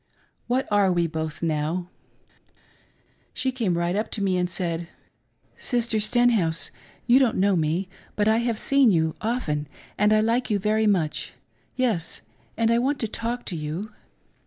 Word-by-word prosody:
What 255 +2 0
are 200 -2 +4
we 175 -1 +2
both 160 -1 -4
now? 165 +3 -1 1.4
She 260 0 0
came 220 -9 -1
right 170 +1 0
up 215 +2 -1
to 205 - -2
me, 190 -2 +1
and 180 0 0
said, 170 -2 -3 0.4
" - - -37
Mrs. 235 -3 0
Stenhouse, 215 -8 +2 0.3
you 245 +2 +6
don't 255 -5 +2
know 195 +1 +3
me, 165 +3 0 0.3
but 210 0 +1
I 220 +1 +4
have 235 -1 0
seen 275 +1 +4
you 160 -4 +2
often, 165 -11 -1 0.3
and 210 +1 +4
I 215 - +5
like 230 +4 +1
you 210 - +2
very 215 +2 +1
much 170 -7 0 0.2
— - - -40
^yes, 225 -11 0 0.4
and 230 0 +2
I 235 - +3
want 275 +4 +1
to 225 - 0
talk 230 +3 -4
to 180 - -4
you." 160 +7 -4
205 Hz, 170 wpm, -25 LUFS, 170-235 Hz, 1.4 s, you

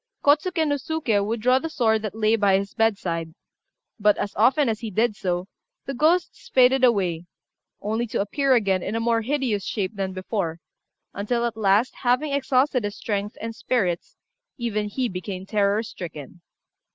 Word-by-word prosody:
Kôtsuké 315 +3 +3
no 290 -1 +1
Suké 255 -8 0
would 220 +2 -2
draw 255 +3 +4
the 325 - -4
sword 220 -7 +1
that 215 -1 -5
lay 220 0 +3
by 200 -3 +3
his 200 0 -4
bedside; 170 -7 -1 0.6
but, 210 0 +4
as 205 - -3
often 260 +6 +4
as 220 -2 -1
he 225 - -5
did 220 +2 +1
so, 180 -2 -2 0.4
the 275 - -4
ghosts 330 +6 +1
faded 260 +1 +4
away, 180 -8 +2 0.5
only 220 +3 -1
to - - -2
appear 265 +6 +2
again 195 -5 +2
in 220 - -3
a - - 0
more 230 0 +1
hideous 245 -5 -1
shape 205 0 -3
than 195 -1 -2
before, 185 -3 -3 0.5
until 235 +4 -1
at 235 -2 -2
last, 215 +3 +2
having 265 +4 +1
exhausted 265 -2 +2
his 205 0 -3
strength 205 -1 -3
and 225 +1 -5
spirits, 195 -8 -1 0.4
even 215 -4 -2
he 250 +5 -1
became 185 -1 -6
terror 205 +1 +1
stricken. 170 - -9
220 Hz, 170 wpm, -24 LUFS, 200-250 Hz, 0.6 s, draw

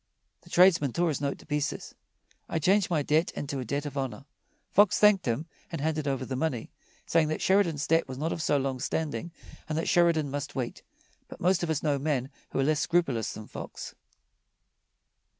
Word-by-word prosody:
The - - -18
tradesman 170 -8 +5
tore 175 -1 +2
his 145 -3 -2
note 140 -1 -1
to - - -16
pieces: 150 -1 -2 0.6
"I - - -1
change 190 +5 +3
my 155 -4 +1
debt 155 +4 +2
into 140 -1 -4
a 130 - -4
debt 140 +5 -2
of 145 - -6
honor." 135 -1 -4 0.5
Fox 205 0 +5
thanked 210 -6 +5
him 120 +7 0 0.3
and 165 - -3
handed 155 0 -1
over 135 -1 -1
the 130 - -4
money, 130 -4 -2 0.3
saying 165 -2 +3
that 155 - -2
Sheridan's 175 -7 +2
debt 165 -2 +2
was 130 -1 -6
not 160 +4 -1
of 165 - -4
so 145 - +2
long 135 -1 -2
standing 150 +1 -2 0.4
and 155 - -1
that 165 - -1
Sheridan 170 -5 +3
must 145 0 -4
wait. 125 -3 -3 0.5
But - - -11
most 180 +1 +2
of 170 - -2
us 155 -2 -1
know 145 -3 +1
men 135 -2 -1 0.2
who - - -5
are - - +3
less 150 +1 +2
scrupulous 140 -9 +1
than 110 - -8
Fox. - - -8
150 Hz, 200 wpm, -28 LUFS, 135-165 Hz, 0.6 s, tradesman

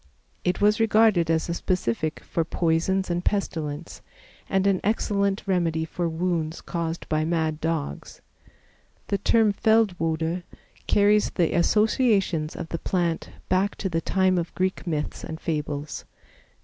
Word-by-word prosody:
It 180 0 0
was 210 +1 +3
regarded 215 -6 +4
as 160 -1 +1
a 170 - -1
specific 155 -4 -1
for 165 - -1
poisons 170 +3 0
and 175 +1 -1
pestilence, 160 -6 -3 0.5
and 195 0 +1
an 195 -2 +2
excellent 200 -2 0
remedy 170 -4 0
for 170 +1 -2
wounds 165 -1 -1
caused 170 -1 -4
by 155 0 +1
mad 160 -1 -1
dogs. 160 - -3 0.9
The 200 - 0
term 220 0 +3
Feldwode 180 -6 +1 0.5
carries 205 +1 +4
the 170 -3 0
associations 200 - +2
of 165 - -6
the 165 - -3
plant 170 -2 -1 0.2
back 190 +2 +1
to 190 - -3
the 165 -1 -1
time 185 0 +2
of 170 - -5
Greek 185 0 -1
myths 150 -3 -3
and 160 - -6
fables. 150 -3 -3
175 Hz, 135 wpm, -25 LUFS, 160-195 Hz, 0.9 s, regarded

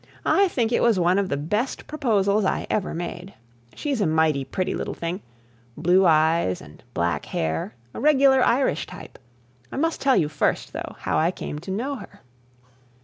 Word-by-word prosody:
I 395 0 +4
think 240 -9 0
it - - +2
was 230 -5 +3
one 180 +2 +3
of 195 -2 -1
the 140 - -1
best 210 - -2
proposals 215 -8 +1
I 190 - 0
ever 200 -3 0
made. 175 +2 -6 0.4
She's 280 -6 -2
a 195 - +2
mighty 155 -3 +2
pretty 180 +7 -2
little - - -4
thing, 170 +4 -4 0.6
blue 180 +3 +4
eyes 160 - +3
and - - -15
black 85 0 0
hair, 80 +8 -2 0.2
a - - -6
regular 275 -3 +5
Irish 240 - +1
type. - - -11 0.5
I - - -5
must 325 +3 0
tell 270 -2 +4
you 155 - +2
first, 150 -1 -1
though, - - -6
how - - 0
I 160 +2 +3
came 150 -4 -5
to 175 - -10
know 255 +9 -2
her. - - -13
190 Hz, 180 wpm, -24 LUFS, 160-245 Hz, 0.6 s, regular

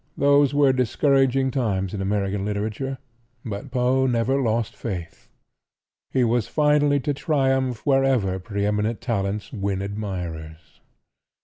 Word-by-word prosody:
Those 140 -1 +4
were 145 -2 +4
discouraging 135 +1 +2
times 100 -8 -1
in 100 - -3
American 100 0 -1
literature, 110 +6 -3 0.5
but 115 +5 -5
Poe 130 +1 +2
never 125 +3 +1
lost 115 -2 -1
faith. 90 -7 -7 0.8
He 130 - +1
was 120 -1 +1
finally 150 -1 +3
to 145 +1 -1
triumph 135 -4 0
wherever 135 -9 +2
pre 100 +1 -3
eminent 105 +2 0
talents 105 -3 -3
win 100 -3 -2
admirers. 90 -6 -6
115 Hz, 120 wpm, -23 LUFS, 100-135 Hz, 0.8 s, Those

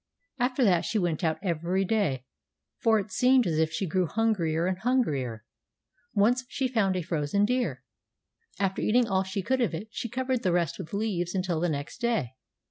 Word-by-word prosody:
After 250 +2 +1
that 180 -6 +4
she 220 - -1
went 175 -4 -1
out 160 -1 +1
every 175 +2 0
day, 155 - 0 0.5
for 225 -1 +4
it 205 0 -6
seemed 250 +4 +4
as 160 -2 0
if 160 0 +2
she 175 +5 -2
grew 180 +1 0
hungrier 175 -7 +1
and 185 0 -1
hungrier. 140 - 0 0.7
Once 235 +5 +3
she 265 - -1
found 215 -7 +1
a 180 - -1
frozen 165 +4 0
deer. 250 +2 -1 0.7
After 195 -1 -1
eating 240 +2 +3
all 190 -2 +2
she 190 +1 -3
could 260 +4 +1
of 220 -8 +1
it 210 +7 -7
she 235 - -4
covered 255 0 -1
the 185 - +1
rest 170 -4 0
with 160 - -7
leaves 195 -4 -1
until 180 -3 0
the 175 +1 +1
next 145 -2 -4
day. 225 - 0
190 Hz, 190 wpm, -28 LUFS, 165-230 Hz, 0.7 s, that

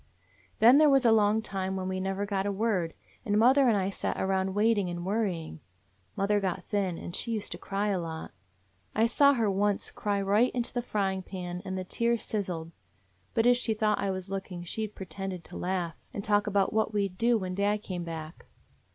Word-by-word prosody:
"Then 245 +6 +7
there 305 -1 +6
was 270 -2 +4
a 230 - +6
long 215 0 +3
time 190 -2 -3
when 185 -1 -3
we 185 0 -2
never 195 +1 -2
got 200 -1 -1
a - - 0
word, 195 -5 0 0.3
and 205 -1 +1
mother 260 +4 +5
and 225 -4 +4
I 195 0 0
sat - - -3
around 190 0 0
wait 220 +1 +3
ing 185 -3 -1
and 175 0 -5
worrying. 185 - -2 0.6
Mother 205 +1 +2
got 190 -2 -2
thin, 195 -5 -1
and 175 - -6
she 235 - -3
used 220 -3 -2
to - - -5
cry 200 +1 -1
a 195 -3 +1
lot. 160 -1 -6 0.6
I 220 - +4
saw 280 +4 +5
her 230 -3 +1
once 200 +1 0
cry 205 -1 -1
right 205 +5 +3
into 240 -1 -2
the 245 - 0
frying 195 -5 -1
pan, 180 -1 -6
and 190 -1 -4
the 185 - -3
tears 235 +4 0
sizzled. 175 -6 -3 0.6
But 225 - +3
if 245 0 +6
she 225 -3 -1
thought 215 0 +1
I 200 - 0
was 185 0 -4
looking 190 -2 -5
she 215 +5 -3
'd 210 - -21
pretend 190 -1 -6
to - - -12
laugh 180 -2 -3
and 200 - -3
talk 205 0 +2
about 200 0 +1
what 220 0 +1
we 200 -1 +2
'd 185 -1 -16
do 235 0 +4
when 185 -3 -4
dad 205 +2 0
came 180 -2 -4
back. 160 -1 -7
200 Hz, 220 wpm, -29 LUFS, 185-220 Hz, 0.6 s, Then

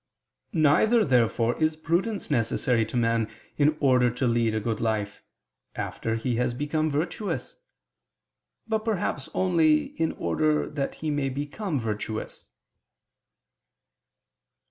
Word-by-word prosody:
Neither, 200 +9 +4
therefore 120 -1 +2
is 155 0 +2
prudence 175 +5 -1
necessary 115 -2 +1
to 125 - -3
man 115 -2 +1 0.3
in 150 +1 +3
order 125 -3 +4
to 125 +2 -2
lead 115 -2 +2
a - - +1
good 110 0 -2
life, 105 -3 -1 0.5
after 115 0 -3
he 115 +1 -1
has 125 0 0
become 155 +3 0
virtuous; 160 +8 -3 1.1
but 220 -1 +1
perhaps 210 - -2
only 165 -5 +3
in 160 - +1
order 155 -1 0
that 145 -2 -3
he 155 -1 -3
may 145 -2 0
become 145 +6 -3
virtuous. 110 -1 -4
140 Hz, 120 wpm, -26 LUFS, 115-155 Hz, 1.1 s, Neither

